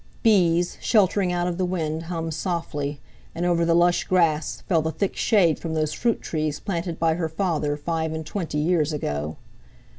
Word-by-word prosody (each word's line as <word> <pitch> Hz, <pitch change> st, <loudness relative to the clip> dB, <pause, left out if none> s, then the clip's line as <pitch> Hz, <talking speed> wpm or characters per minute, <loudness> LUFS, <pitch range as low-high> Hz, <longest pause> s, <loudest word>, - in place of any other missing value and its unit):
Bees, 175 Hz, -6 st, +3 dB
sheltering 195 Hz, -3 st, +3 dB
out 175 Hz, 0 st, 0 dB
of 175 Hz, 0 st, -3 dB
the -, -, +2 dB
wind, 165 Hz, -3 st, -2 dB
hummed 165 Hz, -2 st, -3 dB
softly, 150 Hz, -4 st, -3 dB, 0.4 s
and 170 Hz, -, -1 dB
over 170 Hz, -1 st, +2 dB
the 165 Hz, 0 st, +3 dB
lush 175 Hz, 0 st, +3 dB
grass 165 Hz, -4 st, +1 dB
fell 165 Hz, -5 st, +1 dB
the 160 Hz, -, -1 dB
thick 185 Hz, +5 st, -2 dB
shade 180 Hz, -8 st, +3 dB
from 160 Hz, -1 st, -4 dB
those 155 Hz, -1 st, 0 dB
fruit 235 Hz, -2 st, 0 dB
trees 155 Hz, -2 st, -2 dB
planted 170 Hz, -4 st, -3 dB
by 165 Hz, -1 st, +2 dB
her 165 Hz, -1 st, -2 dB
father 155 Hz, -4 st, -1 dB
five 160 Hz, +1 st, -2 dB
and 160 Hz, 0 st, -4 dB
twenty, 160 Hz, -3 st, -3 dB
years 160 Hz, 0 st, +2 dB
ago. 75 Hz, -, -3 dB
165 Hz, 180 wpm, -24 LUFS, 155-180 Hz, 0.4 s, Bees